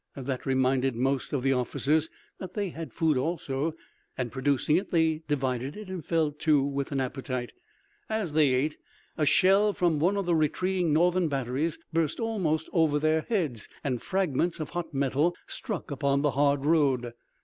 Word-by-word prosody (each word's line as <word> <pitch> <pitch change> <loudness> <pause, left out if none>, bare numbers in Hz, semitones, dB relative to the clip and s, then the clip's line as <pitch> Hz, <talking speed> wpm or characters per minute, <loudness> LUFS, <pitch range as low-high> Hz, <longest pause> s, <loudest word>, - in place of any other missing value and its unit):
That 135 -1 -4
reminded 130 -1 +2
most 135 +2 0
of 140 -4 -1
the 135 0 +3
officers 145 +5 0 0.3
that 185 -1 -8
they 205 -2 -1
had 160 -5 -7
food 160 -1 +1
also, 150 +1 -2 0.4
and 125 -3 -2
producing 140 +3 +1
it 190 - -3
they 160 -2 +2
divided 135 - -1
it 210 -3 -8
and 185 -4 -5
fell 160 -1 +1
to 150 -1 +2
with 140 0 -2
an 140 - 0
appetite. 130 -1 -3 0.6
As 215 -8 -2
they 150 -3 +4
ate, 140 +4 0 0.4
a 155 -2 +1
shell 200 +5 +4
from 170 -5 +1
one 185 +6 +2
of 200 - -1
the 175 - +1
retreating 175 +2 +1
Northern 175 +3 +3
batteries 140 +3 -1 0.2
burst 165 -2 0
almost 185 -9 0
over 160 -4 +3
their 155 +1 +2
heads 155 - -1
and 130 -4 -1
fragments 175 -3 0
of 155 - -5
hot 170 -2 -4
metal 140 +4 +1
struck 205 - -5
upon 140 0 +1
the 145 - +3
hard 140 0 +2
road. 135 -7 +2
150 Hz, 170 wpm, -28 LUFS, 135-170 Hz, 0.6 s, they